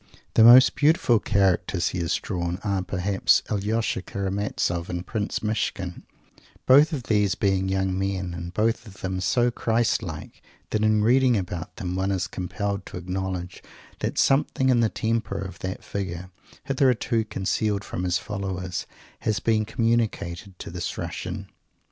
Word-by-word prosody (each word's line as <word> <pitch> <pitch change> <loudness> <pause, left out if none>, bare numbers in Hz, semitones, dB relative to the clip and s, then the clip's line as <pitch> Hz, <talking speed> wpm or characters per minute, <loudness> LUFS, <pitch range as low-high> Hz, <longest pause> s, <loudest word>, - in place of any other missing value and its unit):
The 110 - +6
most 125 +3 +9
beautiful 150 - +3
characters 95 -4 +1
he 90 - -4
has 85 0 0
drawn 85 -3 -3
are, 100 -2 0
perhaps, 95 +1 +2
Alyosha 105 0 0
Karamazov 95 -3 -2
and 90 0 -4
Prince 110 -1 -3
Myshkin; 100 -4 -2 0.6
both 145 +5 +6
of 140 -6 -3
these 105 -3 +2
being 95 -1 +1
young 95 -1 0
men, 95 -2 -2
and 85 0 -6
both 115 +4 0
of 95 -2 -13
them 95 0 -2
so 120 +5 +2
Christ 115 0 +1
like, - - -8 0.3
that 110 - 0
in 110 -1 +3
reading 125 +1 +4
about 90 -1 -5
them 90 -1 -4
one 95 +1 0
is 95 -3 0
compelled 100 +2 -3
to - - -7
acknowledge 90 0 -4 0.4
that - - -3
something 135 -1 +2
in 125 -2 +4
the 115 -2 +3
temper 115 -4 -1
of 95 -2 -6
that 95 +1 -5
Figure, 90 -2 -5 0.3
hitherto 125 -4 +1
concealed 100 0 -1
from 90 - -5
His 90 0 +1
followers, 95 -2 -4 0.3
has 110 -2 0
been 110 -1 +1
communicated 110 -5 -1
to - - -8
this 85 0 -4
Russian. 90 +3 -5
100 Hz, 155 wpm, -25 LUFS, 90-110 Hz, 0.6 s, most